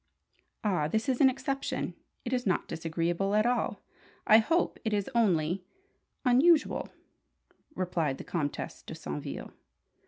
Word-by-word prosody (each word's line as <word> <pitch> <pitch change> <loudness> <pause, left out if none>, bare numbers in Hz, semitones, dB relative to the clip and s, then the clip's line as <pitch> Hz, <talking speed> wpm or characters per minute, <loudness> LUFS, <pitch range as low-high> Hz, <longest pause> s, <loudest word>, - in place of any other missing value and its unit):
"Ah, 180 -8 +1
this 220 - -1
is 260 0 +1
an 270 - +8
exception! 275 +1 -2 0.3
It 245 - -2
is 250 -3 0
not 185 - +1
disagreeable 170 +4 -1
at 215 +1 +4
all 245 0 0 0.4
I 220 - +8
hope. 325 +10 +1
It 220 - -1
is 205 +3 -1
only 180 -6 +2 0.6
unusual," 290 +6 +4 0.9
replied 165 -7 -1
the - - -7
Comtesse 150 -5 -3
de - - -8
Saintville. 75 -1 -6
210 Hz, 130 wpm, -30 LUFS, 170-250 Hz, 0.9 s, an